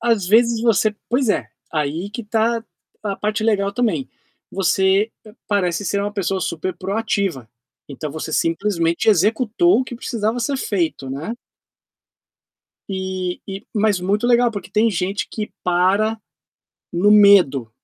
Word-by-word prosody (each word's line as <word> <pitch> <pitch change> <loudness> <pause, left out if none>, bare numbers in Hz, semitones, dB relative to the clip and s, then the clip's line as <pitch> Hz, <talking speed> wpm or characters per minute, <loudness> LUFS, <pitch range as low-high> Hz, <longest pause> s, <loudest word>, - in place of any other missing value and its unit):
às 230 -5 +1
vezes 230 +3 +4
você 220 -2 +2
pois 250 -1 +1
é, 130 - +1 0.3
aí 155 +5 -2
que 235 +2 -6
está 225 +2 0 0.4
a 200 -2 -3
parte 215 +1 -2
legal 200 -3 +1
também. 245 +4 -1 0.4
Você 195 +2 +2 0.4
parece 200 -2 0
ser 200 +2 0
uma 205 +1 -2
pessoa 195 -2 -1
super 170 +1 -3
proativa. 195 - -2 0.4
Então 145 +1 -6
você 160 +1 -6
simplesmente 170 +1 0
executou 225 - +3
o - - -1
que 250 - -8
precisava 230 -1 -2
ser 275 +4 -1
feito, 170 - -2
né. 155 - -4 1.5
E 190 -2 -3
e 195 0 -7
mas 210 -3 +2
muito 205 +5 0
legal, 240 0 +4
porque 200 -4 -7
tem 225 +2 +3
gente 195 +1 -2
que 215 -1 -5
para 195 +5 +2 0.7
no 180 +4 +3
medo, 195 - +5
200 Hz, 140 wpm, -20 LUFS, 180-225 Hz, 1.5 s, medo